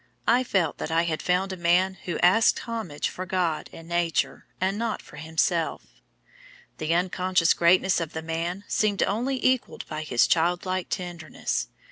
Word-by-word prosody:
I 245 +2 +4
felt 185 - 0
that - - -3
I 165 +1 +2
had 160 -2 -2
found 185 +2 0
a - - -4
man 180 +2 +3
who 175 - -2
asked 190 +6 +5
homage 220 -11 -3
for 185 0 -6
God 175 -4 -1
and 165 - -11
Nature, 170 -2 -1
and 190 +2 0
not 225 0 -2
for 150 - -14
himself. 160 +2 0 1.0
"The 155 0 -1
unconscious 180 -1 +2
greatness 185 +2 +4
of 165 -1 -4
the 160 - -4
man 165 +4 -3
seemed 205 -2 +1
only 245 +6 0
equalled 255 -1 +1
by 155 0 -5
his 130 -6 +3
child 175 +2 +1
like 185 -1 -2
tenderness. 175 -3 -3
175 Hz, 165 wpm, -26 LUFS, 165-190 Hz, 1.0 s, asked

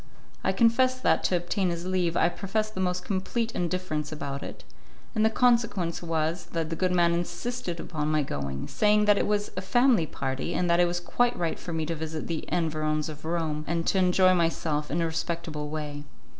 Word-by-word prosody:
I - - +2
confess 255 +2 +3
that, - - +2
to 185 - +2
obtain 180 +2 -1
his 170 0 -3
leave, 180 -2 0
I - - +4
professed 215 +4 -2
the 190 - -6
most 180 -1 -1
complete 220 +4 -1
indifference 175 -5 -2
about 140 -2 -4
it, - - -8 0.5
and 215 -2 +1
the 220 - +5
consequence 230 -8 +2
was 165 +1 -1
that 165 -1 -2
the - - -1
good 185 +2 +1
man 170 -1 +3
insisted 175 +1 -3
upon 155 -3 -3
my 155 -1 +2
going, 70 - -4
saying 210 0 +3
that 205 -1 +5
it - - +1
was 205 0 0
a 185 - -2
family 230 -2 +3
party, 135 +5 -3
and 180 - +1
that 170 - +4
it 175 - +5
was 175 0 -1
quite 245 +7 +1
right 170 -2 -1
for 175 - -6
me 160 -1 -1
to 165 - -2
visit 160 0 -4
the 165 -2 -3
environs 155 -2 0
of 155 0 -9
Rome 160 -2 -1
and 165 0 -1
to 190 - +2
enjoy 185 0 +5
myself 165 -3 0
in 165 +4 0
a - - +2
respectable 160 -2 -3
way. 150 -1 -5
170 Hz, 205 wpm, -27 LUFS, 155-190 Hz, 0.5 s, the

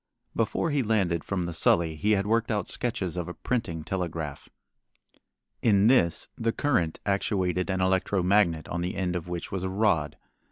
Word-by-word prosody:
Before 165 - 0
he 145 -1 +2
landed 95 -8 +1
from 95 -3 -2
the 85 - -4
Sully 80 0 +2
he 105 +7 +1
had 100 -1 +1
worked 115 +2 +1
out 105 -4 -1
sketches 110 -8 -2
of 90 -1 -3
a 90 - -6
printing 100 -11 -2
telegraph. 80 -5 -4 1.1
In 100 -3 +4
this 110 -9 +3
the 115 0 0
current 115 - 0
actuated 95 -2 0
an 95 0 0
electro 95 0 +1
magnet 90 -5 +2
on 85 - -2
the 90 +2 -3
end 90 -2 -1
of 90 -1 -4
which 90 -1 -5
was 95 - -2
a 95 - -2
rod. 95 -7 +1
95 Hz, 175 wpm, -27 LUFS, 85-105 Hz, 1.1 s, In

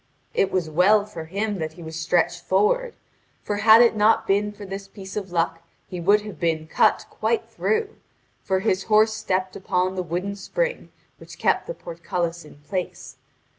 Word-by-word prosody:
It 195 - +1
was 180 -3 0
well 190 +6 +4
for 170 -6 -8
him 200 +4 -2
that 160 -1 -4
he 170 - -11
was 160 0 -7
stretched 165 +1 +1
forward, 450 - +1 0.5
for 205 - -2
had 220 +2 +7
it 235 - +3
not 215 +1 +3
been 205 +1 +1
for 205 0 -10
this 195 0 -7
piece 195 -1 -10
of 195 -3 -4
luck 165 -1 0 0.3
he 180 - -6
would 200 +5 +4
have 205 -6 -9
been 160 -2 0
cut 160 - +2
quite 460 - -1
through; 440 -1 -1 0.4
for 190 -1 0
his 190 -2 0
horse 215 0 +4
stepped 190 -3 -2
upon 185 -1 0
the 185 - -2
wooden 180 +4 -3
spring - - -3 0.3
which - - -12
kept - - +1
the - - -5
portcullis 170 0 -4
in 150 - -15
place. 185 -2 -5
195 Hz, 180 wpm, -24 LUFS, 175-210 Hz, 0.5 s, had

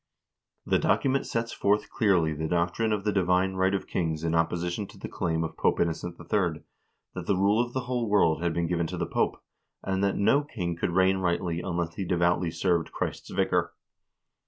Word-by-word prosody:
* - - -56
The - - +2
document 135 0 +1
sets 115 0 -2
forth 105 +1 +1
clearly 95 -10 +2
the 80 +2 -3
doctrine 90 +7 0
of 105 -2 0
the 105 - +1
divine 95 -1 +2
right 95 +1 +2
of 95 - -3
kings 80 -3 -2
in 85 0 0
opposition 85 +4 0
to - - -15
the - - -6
claim 80 -1 -1
of 80 0 -5
Pope - - +1
Innocent 85 +1 -1
III. 85 -2 -1 0.5
that - - -6
the 100 - +2
rule 100 +5 +3
of 120 0 -8
the 130 - -1
whole 125 -3 -2
world 85 -6 +3
had 85 -1 +1
been 85 +1 -1
given 85 -1 0
to - - -5
the - - -1
Pope, - - 0 0.4
and 95 0 -1
that 100 - +1
"no 110 +8 +3
king 90 - -4
could 85 - -1
reign 95 +2 +3
rightly 85 -2 -1
unless 85 -2 -2
he 95 - -4
devoutly 85 0 +1
served 85 -1 0
Christ's - - -4
vicar." - - 0
90 Hz, 205 wpm, -27 LUFS, 85-100 Hz, 0.5 s, rule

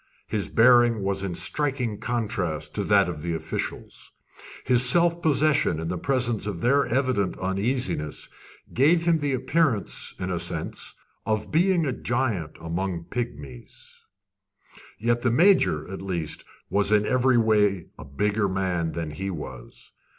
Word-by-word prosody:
His 100 -5 -2
bearing 120 -2 +5
was 95 0 0
in 95 -3 -3
striking 130 - -1
contrast 105 -10 -3
to - - -2
that 100 -3 +4
of 85 -4 -5
the 85 +1 -2
officials. 80 0 -6 0.5
His 125 -1 +4
self 170 +6 +4
possession 150 - +2
in 80 0 -4
the 90 - -2
presence 120 -6 0
of 100 -5 -4
their 140 +8 +2
evident 125 -6 0
uneasiness 95 - -2 0.5
gave 165 +6 +3
him 170 -2 +3
the 145 -2 -1
appearance, 130 - -1
in 95 0 -4
a 90 - -1
sense, 85 -2 -3 0.3
of 110 -1 -2
being 175 +1 +3
a 130 - -1
giant 115 -12 -2
among 85 +1 -3
pigmies; 75 - -7 1.0
yet 120 +2 +1
the 125 - +2
Major, 120 - +3
at 95 - -6
least, 85 -5 -4 0.2
was 100 +1 +1
in 105 -1 +4
every 130 +1 +3
way 105 -5 +2
a - - -7
bigger 100 +8 0
man 90 -3 -1
than 80 -2 -4
he 95 +6 -4
was. 70 -8 -9
105 Hz, 145 wpm, -25 LUFS, 90-130 Hz, 1.0 s, bearing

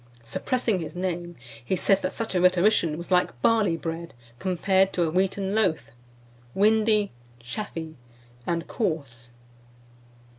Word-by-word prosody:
Suppressing 220 - -1
his 165 +1 -6
name, 175 -1 -3 0.3
he 155 - 0
says 195 +2 +2
that 185 - -1
such 225 -3 -3
a 180 - +2
rhetorician 180 -3 +3
was 170 +2 -8
like 180 -9 +2
barley 215 -7 +3
bread 165 -1 -5 0.2
compared 190 +1 +2
to 175 - +1
a 160 - 0
wheaten 190 +2 0
loaf, 175 - +1 0.6
windy, 215 0 +3 0.3
chaffy, 160 - -6 0.5
and 170 -1 -1
coarse. 140 - -3
180 Hz, 125 wpm, -26 LUFS, 165-200 Hz, 0.6 s, rhetorician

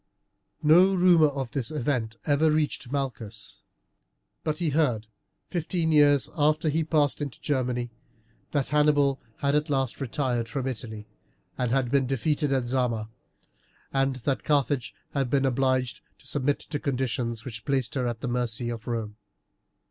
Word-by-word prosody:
No 180 +6 +6
rumour 175 -4 +6
of 135 -4 -4
this 135 0 -1
event 125 -6 -1
ever 150 +1 +3
reached 150 -4 0
Malchus, 115 -7 -3 0.8
but 155 -1 -1
he 170 -3 0
heard, 130 -8 +1 0.4
fifteen 170 -1 -1
years 145 -2 +5
after 155 0 +2
he 155 +2 +1
had 160 -1 -2
passed 150 -2 +2
into 140 -4 -5
Germany, 125 -4 -1 0.6
that 140 -3 -1
Hannibal 145 -2 +3 0.2
had 140 0 +2
at 150 +1 +1
last 135 -2 -1
retired 125 -3 -1
from 135 +1 -3
Italy, 110 -4 -5 0.5
and 125 -2 -1
had 125 -1 +1
been 135 -2 +3
defeated 145 +3 0
at 130 -2 +1
Zama, 120 -3 -1 0.8
and 135 -1 +2
that 130 +2 -2
Carthage 140 -4 +1 0.2
had 135 -3 -1
been 135 +1 +2
obliged 130 -1 +1 0.2
to - - -22
submit 140 +1 0
to 145 -1 -4
conditions 120 -4 -2
which 110 -4 -6
placed 135 -4 0
her 130 -3 0
at 120 -2 -4
the 135 - -3
mercy 120 -1 -1
of 115 -2 -6
Rome. 110 -3 -3
135 Hz, 155 wpm, -27 LUFS, 120-150 Hz, 0.8 s, No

